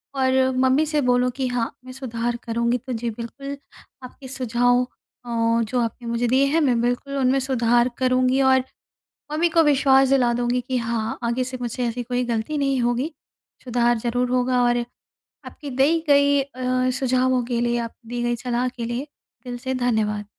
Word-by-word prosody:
और 260 0 +2
मम्मी 260 +4 +3
से 300 -1 0
बोलूँ 250 -1 +2
कि 265 -2 -1
हाँ, 245 -2 -1
मैं 255 - -9
सुधार 240 -2 -3
करूँगी। 235 +1 0
तो 255 +1 -7
जी 235 0 -2
बिल्कुल, 275 +5 -7 0.5
आपके 260 +2 -11
सुझाव 245 -1 +1 0.4
अ, - - -9 0.3
जो 245 +3 -2
आपने 235 +1 -3
मुझे 235 +1 0
दिए 260 +3 +3
हैं, 325 +3 +2
मैं 250 -5 +2
बिल्कुल 245 +3 -1
उनमें 265 0 +2
सुधार 240 -2 +2
करूँगी 255 +1 +2
और 260 -1 +4 0.7
मम्मी 330 +3 +1
को 330 0 +4
विश्वास 270 -2 +4
दिला 255 -3 +3
दूँगी 245 +1 0
कि 255 +1 -2
हाँ, 230 -2 -2
आगे 235 +2 0
से 255 0 -6
मुझसे 245 +1 -3
ऐसी 245 +1 -3
कोई 250 +1 -1
गलती 235 +5 -2
नहीं 275 -2 +1
होगी। 245 +6 0 0.5
सुधार 240 -1 +1
ज़रूर 245 +2 -1
होगा 250 0 +2
और 240 0 +3 0.7
आपकी 290 -3 -8
दी 300 +5 +3
गई 285 0 +5
अ, 255 -1 -1
सुझावों 255 -1 +1
के 235 -1 -2
लिए, 240 0 +1
आप 230 -1 -4
दी 240 +1 -4
गई 240 0 0
सलाह 245 +1 -1
के 245 -2 -6
लिए 240 +4 -3 0.4
दिल 245 -1 -5
से 260 +1 -3
धन्यवाद। 220 -4 0
250 Hz, 180 wpm, -23 LUFS, 240-265 Hz, 0.7 s, गई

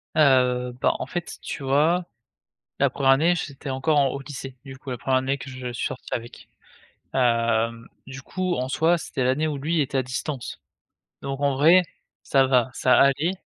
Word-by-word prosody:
Heu, 125 -4 +3
bah, - - +3
en - - -3
fait, 175 -1 -6
tu 140 - -6
vois, 155 +7 +2 0.7
la - - +4
première 135 -1 +2
année, 165 +6 +4
j'étais 140 -4 -6
encore, 135 +4 +1
en 140 - +4
au 140 - -4
lycée, 135 -1 -8
du 135 -1 -9
coup, 135 - -10
la 125 - -3
première 130 +1 +1
année 135 +2 -1
que 135 - -9
je 130 -1 -6
suis 120 - -3
sorti 130 - -8
avec. 120 0 -7 0.7
Hem, 115 -2 +1 0.2
du 135 0 -9
coup, 185 +4 -2
en 130 -3 -2
soi, 160 +6 +2
c'était 135 -5 -3
l'année 140 +5 +1
où 150 - -3
lui, 160 +4 0
était 135 -1 -1
à - - +2
distance. 130 +1 -5 0.6
Donc 135 0 -4
en 140 -1 +1
vrai, 165 +7 +6 0.4
ça 135 -1 +3
va, 130 -1 +2
ça 130 - +3
allait. 155 +7 +2
135 Hz, 190 wpm, -24 LUFS, 130-150 Hz, 0.7 s, vrai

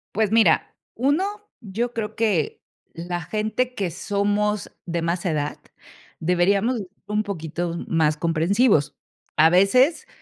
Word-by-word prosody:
Pues 215 -1 +1
mira, 220 -8 +3 0.2
1 285 - +2 0.3
yo 230 +2 -3
creo 215 -1 -4
que 205 -9 0 0.3
la 175 +1 -4
gente 215 +8 -2
que 190 -4 -2
somos 205 +3 -1
de 170 -1 -2
más 170 +2 -2
edad 150 -4 -1 0.6
deberíamos 195 +8 +2
de 200 - -5
ser - - -37 0.2
un 210 +1 0
poquito 170 -2 -4
más 155 -2 +2
comprensivos. 170 - +2 0.4
A 160 +1 +6
veces, 250 - +3
195 Hz, 130 wpm, -23 LUFS, 170-220 Hz, 0.6 s, A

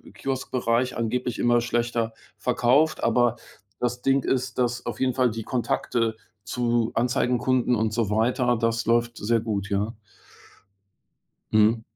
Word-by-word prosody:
im - - -15
Kioskbereich 130 -2 -1
angeblich 120 +1 -2
immer 120 0 +3
schlechter 120 -1 -1 0.2
verkauft. 140 +6 +2
Aber 120 0 +3 0.4
das 125 0 -2
Ding 135 0 +2
ist, 130 -1 -1
dass 120 -1 -1
auf - - -4
jeden 130 -1 +1
Fall 125 -2 +2
die 110 0 -5
Kontakte 115 -1 -1 0.3
zu 120 +2 0
Anzeigenkunden 125 0 +1
und 110 -1 0
so 110 -2 0
weiter, 120 +3 +2
das 115 0 0
läuft 120 0 +1
sehr 115 +3 +1
gut, 100 -3 -3
ja. 100 +3 0 1.6
Mhm. 110 +1 +4
120 Hz, 135 wpm, -25 LUFS, 115-125 Hz, 1.6 s, Mhm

